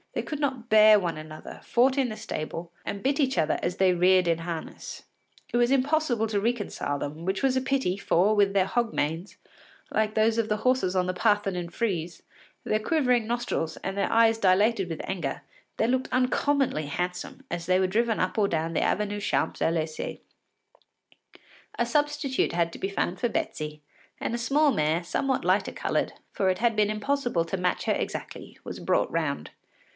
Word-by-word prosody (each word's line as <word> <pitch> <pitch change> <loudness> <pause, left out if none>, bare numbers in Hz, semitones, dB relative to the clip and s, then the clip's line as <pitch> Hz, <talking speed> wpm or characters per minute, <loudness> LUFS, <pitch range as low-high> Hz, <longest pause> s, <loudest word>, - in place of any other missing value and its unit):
They - - -2
could 300 - -5
not 265 -5 -2
bear 215 -2 +7
one 175 -4 -2
another, 155 0 -9
fought 260 +3 +2
in 265 -3 +2
the 215 - -6
stable, 165 +2 -5
and 200 - -5
bit 275 +2 +1
each 265 -6 +1
other 155 -2 +1
as 180 - -2
they 190 -1 +4
reared 180 0 +4
in 165 -1 +2
harness. 165 -1 -6 0.5
It - - +3
was 240 +1 +3
impossible 275 -4 +2
to 210 -2 0
reconcile 210 -10 -2
them, 150 +4 -5
which 190 +4 -2
was 265 -1 +3
a 260 - +2
pity, 260 -8 0
for 200 +2 +2
with 200 -1 +3
their 195 -2 +3
hog 235 +3 -1
manes, 165 +6 -2 0.5
like 215 0 0
those 220 +1 +3
of 225 - 0
the 210 - +1
horses 220 -5 +1
on 180 -1 +2
the 185 - -1
Parthenon 195 -3 +1
frieze, 175 -4 -3 0.4
their 215 - 0
quivering 250 -3 +1
nostrils, 235 -9 -2
and 195 - -3
their 200 - 0
eyes 225 0 +4
dilated 195 0 +3
with 165 - -4
anger, 170 -8 -3 0.3
they 220 - +2
looked 260 +1 0
uncommonly 255 - +1
handsome 180 - -4
as 175 -1 -3
they 185 0 +3
were 190 - +2
driven 225 +3 +1
up - - -1
or 205 -2 +3
down 165 -2 -1
the - - +1
Avenue 205 0 0
des - - -9
Champs 200 - 0
Élysées. 160 -1 -1 1.6
A 235 - +2
substitute 295 - 0
had 170 -1 0
to - - -9
be 195 - -2
found 185 -2 -2
for 240 - +1
Betsy, 150 -7 -3 0.4
and - - -2
a - - 0
small 285 +5 +3
mare, 155 - +1
somewhat 265 +9 -1
lighter - - +2
coloured, - - -1 0.2
for 190 - +1
it 185 - +1
had 235 -1 +1
been 210 -1 +3
impossible 215 -4 0
to 170 - -3
match 180 -1 -1
her - - +2
exactly, - - -5
was - - -7
brought - - +1
round. - - -2
205 Hz, 190 wpm, -27 LUFS, 175-240 Hz, 1.6 s, bear